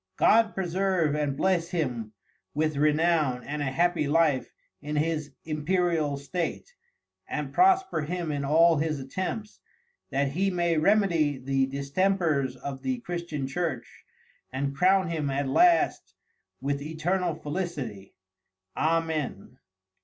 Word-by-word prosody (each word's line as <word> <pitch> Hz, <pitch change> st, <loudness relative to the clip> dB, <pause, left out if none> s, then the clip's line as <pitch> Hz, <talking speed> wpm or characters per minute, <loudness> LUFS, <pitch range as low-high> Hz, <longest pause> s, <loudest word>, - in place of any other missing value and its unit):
God 225 Hz, 0 st, +4 dB
preserve 185 Hz, -3 st, 0 dB
and 145 Hz, -2 st, -1 dB
bless 180 Hz, -3 st, +1 dB
him 125 Hz, -, -2 dB, 0.4 s
with 155 Hz, 0 st, 0 dB
Renown 150 Hz, -3 st, +2 dB
and 150 Hz, +1 st, -4 dB
a -, -, 0 dB
happy 170 Hz, +1 st, +1 dB
Life 150 Hz, -3 st, +2 dB, 0.3 s
in 150 Hz, +1 st, -4 dB
his 155 Hz, -1 st, -1 dB
Imperial 155 Hz, -1 st, 0 dB
State, 165 Hz, -, -4 dB, 0.6 s
and -, -, -4 dB
prosper 375 Hz, -, +3 dB
him 170 Hz, +1 st, -3 dB
in 145 Hz, -1 st, -2 dB
all 165 Hz, +3 st, +5 dB
his 155 Hz, -1 st, -1 dB
Attempts, 185 Hz, +10 st, -5 dB, 0.5 s
that 140 Hz, 0 st, 0 dB
he 185 Hz, +8 st, 0 dB
may 175 Hz, -2 st, +1 dB
remedy 165 Hz, -6 st, +3 dB
the 135 Hz, +1 st, 0 dB
Distempers 140 Hz, 0 st, 0 dB
of 135 Hz, +1 st, -7 dB
the 260 Hz, -1 st, -1 dB
Christian 170 Hz, -, -4 dB
Church, 135 Hz, -2 st, -4 dB, 0.5 s
and 140 Hz, +1 st, -2 dB
Crown 185 Hz, +3 st, +3 dB
him 155 Hz, -4 st, -1 dB
at 140 Hz, +1 st, -1 dB
last 340 Hz, -, +3 dB, 0.5 s
with 140 Hz, +1 st, -1 dB
Eternal 165 Hz, +3 st, -1 dB
Felicity, 145 Hz, -, -5 dB, 0.6 s
Amen. 155 Hz, -7 st, -1 dB
155 Hz, 125 wpm, -27 LUFS, 140-175 Hz, 0.6 s, all